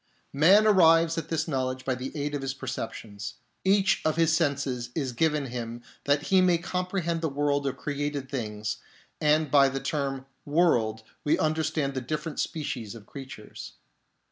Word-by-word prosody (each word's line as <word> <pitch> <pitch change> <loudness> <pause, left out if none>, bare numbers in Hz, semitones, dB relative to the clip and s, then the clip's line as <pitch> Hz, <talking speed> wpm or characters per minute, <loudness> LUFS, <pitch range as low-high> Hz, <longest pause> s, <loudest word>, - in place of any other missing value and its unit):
Man 185 +9 +6
arrives 165 -5 +5
at 160 - -7
this 160 -1 -1
knowledge 130 -3 -2
by 130 - +1
the 130 +1 -5
aid 145 +1 -2
of 145 - -2
his 135 0 -3
perceptions; 110 -5 -6 0.3
each 195 0 +3
of 155 - +1
his 165 -1 +3
senses 140 -6 0
is 135 -5 -1
given 150 +2 +1
him 120 -1 -5 0.2
that 145 +1 +2
he 190 -1 +4
may 180 -2 +4
comprehend 180 -1 -2
the 160 - 0
world 145 0 0
of 135 0 -3
created 145 -1 -3
things, 110 -5 -3 0.4
and 150 -1 +3
by 140 -2 +6
the 135 +1 -3
term 135 -2 -2
" - - -45
world 120 -9 +2
" - - -40
we 150 - +3
understand 155 -2 0
the 130 - -3
different 150 +4 -4
species 120 -8 -3
of 110 -3 -12
creatures. 135 - -9
145 Hz, 170 wpm, -27 LUFS, 130-160 Hz, 0.4 s, Man